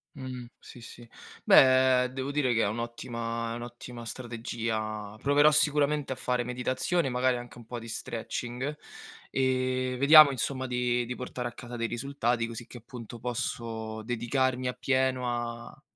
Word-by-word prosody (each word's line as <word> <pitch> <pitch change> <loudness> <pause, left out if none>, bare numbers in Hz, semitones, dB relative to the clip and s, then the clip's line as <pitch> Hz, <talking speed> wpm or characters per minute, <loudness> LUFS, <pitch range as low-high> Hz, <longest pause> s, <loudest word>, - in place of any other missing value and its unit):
Mh, 130 -3 -6
sì, 120 - -13
sì. 120 +1 -12 0.4
Beh, 130 -1 +6
devo 135 +1 -4
dire 140 -4 +1
che 115 - +2
è - - +2
un'ottima 115 +1 -4
è 115 - -3
un'ottima 120 0 -8
strategia. 110 -3 -4
Proverò 145 +2 +5
sicuramente 150 -1 +2
a - - -9
fare 125 -1 -1
meditazione, 130 +6 -1
magari 125 0 +1
anche 120 0 -9
un 115 - -13
po' 120 - -5
di 115 0 -8
stretching, 120 +4 -4 0.5
ehm, 130 -1 0
vediamo 145 +1 +9
insomma 130 +1 -2
di 125 -1 0
di 125 - -5
portare 125 -1 -4
a - - -13
casa 120 0 -9
dei 115 -1 -2
risultati 120 -1 -1
così 115 0 -7
che 120 - -11
appunto 120 -1 -10
posso 115 -2 -4
dedicarmi 125 +2 0
appieno 130 0 0
a 120 0 -5
125 Hz, 150 wpm, -29 LUFS, 115-130 Hz, 0.5 s, vediamo